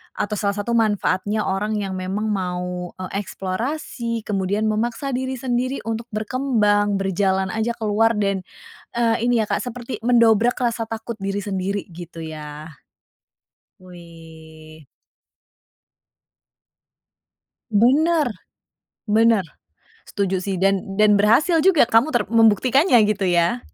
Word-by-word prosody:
atau 210 Hz, 0 st, -2 dB
salah 200 Hz, -1 st, 0 dB
satu 205 Hz, +3 st, -3 dB
manfaatnya 210 Hz, -2 st, +1 dB
orang 205 Hz, +3 st, -1 dB
yang 200 Hz, -2 st, -3 dB
memang 190 Hz, +3 st, -3 dB
mau, 180 Hz, -2 st, -4 dB
eee, 185 Hz, 0 st, -7 dB
eksplorasi, 230 Hz, +4 st, -4 dB
kemudian 200 Hz, +1 st, -1 dB
memaksa 230 Hz, +6 st, -1 dB
diri 260 Hz, +1 st, -2 dB
sendiri 255 Hz, +1 st, -2 dB
untuk 225 Hz, +1 st, -4 dB
berkembang, 215 Hz, -3 st, 0 dB
berjalan 190 Hz, 0 st, 0 dB
aja 225 Hz, +2 st, -2 dB
keluar, 225 Hz, +1 st, +1 dB
dan, 195 Hz, -3 st, -1 dB, 0.5 s
eee, 230 Hz, 0 st, +1 dB
ini 235 Hz, -2 st, +2 dB
ya, 210 Hz, -, -6 dB
Kak, -, -, -1 dB
seperti 245 Hz, -2 st, -6 dB
mendobrak 235 Hz, -1 st, +4 dB
rasa 235 Hz, -2 st, -1 dB
takut 225 Hz, 0 st, -6 dB
diri 195 Hz, +1 st, -2 dB
sendiri 195 Hz, 0 st, -3 dB
gitu 165 Hz, -1 st, -9 dB
ya. 155 Hz, 0 st, -8 dB, 1.1 s
Wih. 160 Hz, -3 st, -14 dB, 2.9 s
Bener, 285 Hz, +8 st, +3 dB, 0.8 s
bener. 220 Hz, -1 st, +3 dB, 0.7 s
Setuju 195 Hz, -2 st, -1 dB
sih 190 Hz, 0 st, -3 dB
dan 195 Hz, +1 st, +2 dB, 0.2 s
dan 210 Hz, -1 st, +4 dB
berhasil 285 Hz, -, +4 dB
juga 345 Hz, -2 st, +5 dB
kamu 230 Hz, +4 st, +3 dB
ter 240 Hz, -8 st, 0 dB
membuktikannya 230 Hz, -, +4 dB
gitu 200 Hz, -3 st, 0 dB
ya. 175 Hz, +7 st, +2 dB
210 Hz, 115 wpm, -21 LUFS, 190-235 Hz, 2.9 s, juga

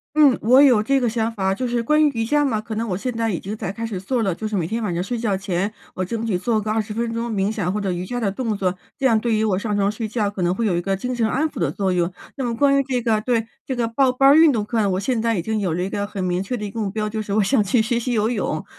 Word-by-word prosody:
嗯， 290 Hz, -5 st, +6 dB
我 250 Hz, +5 st, +5 dB
有 250 Hz, -7 st, +5 dB
这 275 Hz, +5 st, +2 dB
个 245 Hz, -, +1 dB
想 225 Hz, 0 st, -1 dB
法， 190 Hz, -3 st, 0 dB
就 250 Hz, +5 st, -3 dB
是 240 Hz, 0 st, 0 dB
关 300 Hz, +6 st, +3 dB
于 295 Hz, -, +4 dB
瑜 225 Hz, -1 st, 0 dB
伽 295 Hz, +5 st, +2 dB
嘛， 225 Hz, -6 st, 0 dB
可 220 Hz, +1 st, -6 dB
能 225 Hz, +1 st, -2 dB
我 180 Hz, -, -1 dB
现 250 Hz, +6 st, -3 dB
在 230 Hz, -1 st, -1 dB
已 180 Hz, -, -1 dB
经 200 Hz, +3 st, -5 dB
在 210 Hz, -4 st, -4 dB
开 230 Hz, +3 st, -4 dB
始 205 Hz, -5 st, -4 dB
做 240 Hz, +5 st, -1 dB
了， 195 Hz, -4 st, 0 dB
就 215 Hz, +5 st, -4 dB
是 215 Hz, -, -2 dB
每 170 Hz, -4 st, 0 dB
天 225 Hz, +6 st, -3 dB
晚 205 Hz, -5 st, -1 dB
上 170 Hz, +1 st, -1 dB
睡 235 Hz, +6 st, -3 dB
觉 215 Hz, -4 st, 0 dB
前， 190 Hz, +1 st, -2 dB, 0.2 s
我 185 Hz, -, -2 dB
争 230 Hz, +4 st, -3 dB
取 210 Hz, -5 st, 0 dB
做 220 Hz, +3 st, 0 dB
个 215 Hz, +1 st, -2 dB
20 215 Hz, -1 st, -2 dB
分 230 Hz, +1 st, -2 dB
钟 230 Hz, +1 st, -3 dB
冥 200 Hz, -1 st, 0 dB
想， 185 Hz, -5 st, -1 dB
或 210 Hz, -, -2 dB
者 195 Hz, -2 st, -1 dB
瑜 175 Hz, 0 st, -3 dB
伽 245 Hz, +5 st, -3 dB
的 210 Hz, -5 st, 0 dB
动 225 Hz, 0 st, -2 dB
作， 185 Hz, -2 st, -1 dB, 0.2 s
这 270 Hz, -, 0 dB
样 230 Hz, -4 st, +4 dB
对 235 Hz, 0 st, 0 dB
于 215 Hz, 0 st, +1 dB
我 195 Hz, -4 st, +1 dB
上 210 Hz, 0 st, -2 dB
床 200 Hz, 0 st, +1 dB
睡 220 Hz, 0 st, -4 dB
觉， 210 Hz, -2 st, -1 dB
可 200 Hz, -, -7 dB
能 175 Hz, 0 st, +2 dB
会 230 Hz, -, -2 dB
有 190 Hz, -, +1 dB
一 -, -, +1 dB
个 195 Hz, +2 st, -1 dB
精 250 Hz, +6 st, -3 dB
神 230 Hz, -2 st, +1 dB
安 285 Hz, +7 st, +1 dB
抚 -, -, -8 dB
的 165 Hz, -5 st, +1 dB
作 190 Hz, +4 st, -1 dB
用。 175 Hz, -1 st, +1 dB, 0.3 s
那 270 Hz, -, -3 dB
么 235 Hz, -1 st, -1 dB
关 275 Hz, +2 st, +4 dB
于 -, -, +3 dB
这 255 Hz, -2 st, -1 dB
个 220 Hz, -2 st, +2 dB
对， 230 Hz, 0 st, 0 dB, 0.2 s
这 260 Hz, -, -3 dB
个 240 Hz, -1 st, 0 dB
报 255 Hz, +3 st, +2 dB
班 270 Hz, +2 st, +5 dB
儿 -, -, +7 dB
运 320 Hz, 0 st, +7 dB
动 225 Hz, -6 st, 0 dB
课， 215 Hz, -1 st, 0 dB
我 185 Hz, -, 0 dB
现 235 Hz, +3 st, 0 dB
在 230 Hz, 0 st, +1 dB
已 175 Hz, -, -1 dB
经 220 Hz, +3 st, -1 dB
有 180 Hz, -5 st, -1 dB
了 180 Hz, -, -1 dB
一 190 Hz, -, -3 dB
个 205 Hz, 0 st, -2 dB
很 200 Hz, -2 st, -4 dB
明 180 Hz, 0 st, 0 dB
确 225 Hz, +6 st, -3 dB
的 210 Hz, -, -5 dB
一 205 Hz, -, -4 dB
个 225 Hz, -, -5 dB
目 205 Hz, -2 st, -1 dB
标， 215 Hz, +1 st, -2 dB
就 220 Hz, +1 st, -3 dB
是 205 Hz, -1 st, -4 dB
我 215 Hz, -, +3 dB
想 220 Hz, +3 st, +3 dB
去 220 Hz, +3 st, +2 dB
学 235 Hz, +2 st, 0 dB
习 245 Hz, +1 st, -2 dB
游 220 Hz, -1 st, +1 dB
泳。 200 Hz, -9 st, -2 dB
220 Hz, 365 characters per minute, -22 LUFS, 195-240 Hz, 0.3 s, 儿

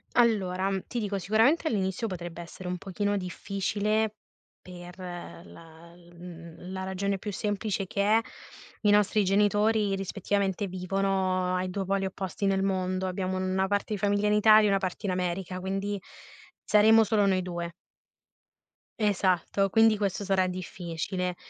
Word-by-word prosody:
Allora, 195 Hz, -5 st, +2 dB, 0.2 s
ti 245 Hz, -, -3 dB
dico 205 Hz, -2 st, -2 dB
sicuramente 225 Hz, -, +3 dB
all'inizio 195 Hz, 0 st, -1 dB
potrebbe 175 Hz, -3 st, -6 dB
essere 175 Hz, +2 st, -9 dB
un 180 Hz, 0 st, -2 dB
pochino 205 Hz, +2 st, -2 dB
difficile 205 Hz, +3 st, -1 dB, 0.5 s
per 180 Hz, 0 st, -11 dB
la 170 Hz, -2 st, -10 dB
l 175 Hz, 0 st, -19 dB
mhmm, 170 Hz, 0 st, -10 dB
la 190 Hz, 0 st, -4 dB
ragione 195 Hz, +1 st, -2 dB
più 205 Hz, -, -5 dB
semplice 205 Hz, 0 st, -2 dB
che 200 Hz, -, -2 dB
è: 215 Hz, +3 st, +4 dB, 0.6 s
i 210 Hz, -, +3 dB
nostri 210 Hz, 0 st, +4 dB
genitori 205 Hz, +1 st, +2 dB
rispettivamente 195 Hz, +1 st, -1 dB
vivono 185 Hz, 0 st, 0 dB
ai 185 Hz, 0 st, -1 dB
2 195 Hz, +1 st, -3 dB
poli 195 Hz, +1 st, 0 dB
opposti 190 Hz, 0 st, -4 dB
nel 195 Hz, 0 st, +1 dB
mondo. 185 Hz, -1 st, -1 dB
Abbiamo 185 Hz, 0 st, -2 dB
una 185 Hz, +1 st, 0 dB
parte 205 Hz, +2 st, -1 dB
di 205 Hz, -, -3 dB
famiglia 205 Hz, 0 st, +1 dB
in 210 Hz, -, +3 dB
Italia 215 Hz, 0 st, +6 dB
e -, -, +2 dB
una 195 Hz, 0 st, +3 dB
parte 185 Hz, +1 st, -4 dB
in 195 Hz, -, 0 dB
America, 185 Hz, 0 st, -2 dB
quindi 195 Hz, +2 st, -3 dB, 0.6 s
saremo 220 Hz, +1 st, +6 dB
solo 210 Hz, -1 st, +2 dB
noi 190 Hz, -1 st, +2 dB
2. 175 Hz, -1 st, -5 dB, 1.3 s
Esatto, 195 Hz, -1 st, +1 dB
quindi 225 Hz, +2 st, +5 dB
questo 200 Hz, -1 st, -2 dB
sarà 190 Hz, -2 st, +2 dB
difficile. 180 Hz, 0 st, -4 dB
195 Hz, 150 wpm, -28 LUFS, 185-205 Hz, 1.3 s, Italia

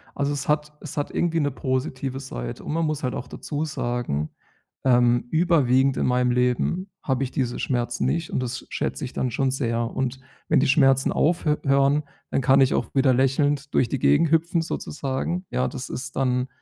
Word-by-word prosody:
Also, 140 Hz, +1 st, 0 dB
es 140 Hz, 0 st, -4 dB
hat 150 Hz, 0 st, 0 dB
es 155 Hz, -, -8 dB
hat 145 Hz, -, -1 dB
irgendwie 165 Hz, -1 st, 0 dB
'ne 145 Hz, -1 st, 0 dB
positive 130 Hz, 0 st, -2 dB
Seite, -, -, -6 dB
und -, -, -4 dB
man 165 Hz, 0 st, +1 dB
muss 155 Hz, -1 st, -2 dB
halt 125 Hz, -1 st, -1 dB
auch -, -, -5 dB
dazu 150 Hz, +1 st, -4 dB
sagen, 120 Hz, -, -2 dB, 0.6 s
ähm, 120 Hz, -1 st, +4 dB
überwiegend 140 Hz, -6 st, +3 dB
in -, -, +1 dB
meinem 125 Hz, 0 st, +2 dB
Leben 125 Hz, +10 st, 0 dB
habe 135 Hz, -1 st, 0 dB
ich 130 Hz, -, -2 dB
diese 125 Hz, -3 st, -2 dB
Schmerzen 120 Hz, -2 st, -1 dB
nicht. 165 Hz, 0 st, -1 dB
Und -, -, 0 dB
das 125 Hz, 0 st, -4 dB
schätze -, -, -3 dB
ich 125 Hz, -, -8 dB
dann 130 Hz, -, -1 dB
schon 135 Hz, +3 st, +1 dB
sehr. 120 Hz, -3 st, -1 dB
Und 130 Hz, 0 st, -2 dB, 0.3 s
wenn -, -, +4 dB
die 145 Hz, -, +2 dB
Schmerzen 135 Hz, -2 st, +4 dB
aufhö 155 Hz, -2 st, +2 dB
hören, 140 Hz, +2 st, +3 dB, 0.3 s
dann -, -, +1 dB
kann 135 Hz, +1 st, +5 dB
ich 130 Hz, -, +4 dB
auch -, -, 0 dB
wieder 135 Hz, -1 st, +4 dB
lächelnd 140 Hz, +2 st, +1 dB
durch 120 Hz, -, +3 dB
die 135 Hz, -, -2 dB
Gegend 155 Hz, +2 st, +3 dB
hüpfen, 165 Hz, +1 st, +2 dB
sozusagen. 155 Hz, +3 st, -3 dB
Ja, 125 Hz, +1 st, +1 dB
das 130 Hz, -2 st, -6 dB
ist 125 Hz, -, -6 dB
dann 125 Hz, -1 st, +1 dB
135 Hz, 195 wpm, -24 LUFS, 125-150 Hz, 0.6 s, kann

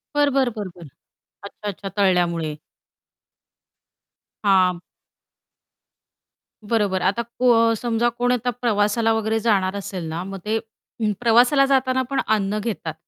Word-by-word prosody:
बरं, 290 Hz, -1 st, +3 dB
बरं, 265 Hz, -2 st, +2 dB
बरं, 205 Hz, -3 st, -5 dB
बरं. 170 Hz, -3 st, -12 dB, 0.6 s
अच्छा-अच्छा 200 Hz, -1 st, -7 dB
तळल्यामुळे. 175 Hz, -5 st, +1 dB, 1.9 s
हां. 185 Hz, -3 st, +3 dB, 1.9 s
बरोबर. 200 Hz, -5 st, +1 dB
आता 195 Hz, +5 st, +1 dB
को 230 Hz, -1 st, +2 dB
समजा 235 Hz, +1 st, 0 dB
कोण 245 Hz, +1 st, -1 dB
आता 245 Hz, 0 st, -1 dB
प्रवासाला 225 Hz, 0 st, +2 dB
वगैरे 220 Hz, 0 st, 0 dB
जाणार 200 Hz, -4 st, +1 dB
असेल 195 Hz, -3 st, -5 dB
ना, 165 Hz, +2 st, -4 dB
मग 195 Hz, +1 st, -7 dB
ते 220 Hz, +1 st, 0 dB, 0.4 s
ऊ 215 Hz, -, +1 dB
प्रवासाला 245 Hz, +4 st, +4 dB
जाताना 260 Hz, -1 st, +2 dB
पण 275 Hz, -, 0 dB
अन्न 205 Hz, 0 st, -1 dB
घेतात. 205 Hz, -7 st, -4 dB
215 Hz, 120 wpm, -22 LUFS, 195-240 Hz, 1.9 s, प्रवासाला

